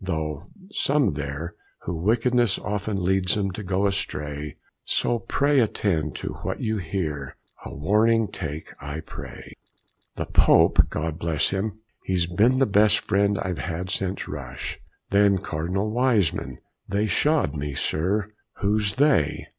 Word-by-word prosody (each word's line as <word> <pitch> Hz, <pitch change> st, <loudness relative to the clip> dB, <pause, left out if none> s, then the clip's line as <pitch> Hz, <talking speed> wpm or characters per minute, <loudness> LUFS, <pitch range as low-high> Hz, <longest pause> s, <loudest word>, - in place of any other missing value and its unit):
Though 80 Hz, -5 st, -2 dB, 0.3 s
some 140 Hz, -, +2 dB
there, 75 Hz, +3 st, -4 dB, 0.3 s
who 85 Hz, -, -3 dB
wickedness 115 Hz, +5 st, +2 dB
Oft 105 Hz, +1 st, -3 dB
leads 95 Hz, -2 st, +1 dB
'em 100 Hz, -2 st, 0 dB
to 95 Hz, -, -6 dB
go 95 Hz, 0 st, 0 dB
astray; 75 Hz, -6 st, -2 dB, 0.3 s
So 120 Hz, -, +1 dB
pray 140 Hz, +5 st, +2 dB
attend 90 Hz, -9 st, 0 dB
to -, -, -4 dB
what -, -, -3 dB
you 110 Hz, -1 st, -1 dB
hear. 75 Hz, -6 st, -3 dB, 0.3 s
And -, -, -8 dB
a -, -, -8 dB
warning 110 Hz, +8 st, +3 dB
take 80 Hz, -3 st, -6 dB
I 70 Hz, +3 st, -5 dB
pray. -, -, -9 dB, 0.6 s
"The -, -, -3 dB
Pope, -, -, +5 dB
God 80 Hz, +1 st, -3 dB
bless 80 Hz, -4 st, 0 dB
him! 105 Hz, +2 st, -3 dB, 0.2 s
he's 90 Hz, -2 st, +1 dB
been 105 Hz, +9 st, +3 dB
the 135 Hz, -, +4 dB
best 105 Hz, -1 st, +4 dB
friend 100 Hz, 0 st, +2 dB
I've 90 Hz, -3 st, -3 dB
had 90 Hz, +2 st, -4 dB
since 95 Hz, 0 st, -2 dB
Rush. 65 Hz, -5 st, -6 dB, 0.3 s
Then 100 Hz, 0 st, +5 dB
Cardinal 95 Hz, +4 st, -2 dB
Wiseman. 115 Hz, -, +1 dB, 0.3 s
They 100 Hz, +2 st, +1 dB
shod 145 Hz, -, +2 dB
me, 70 Hz, -1 st, -4 dB
sir." 100 Hz, +10 st, 0 dB, 0.2 s
"Who's 105 Hz, -1 st, 0 dB
they!" 140 Hz, -, +2 dB
95 Hz, 145 wpm, -25 LUFS, 80-105 Hz, 0.6 s, Pope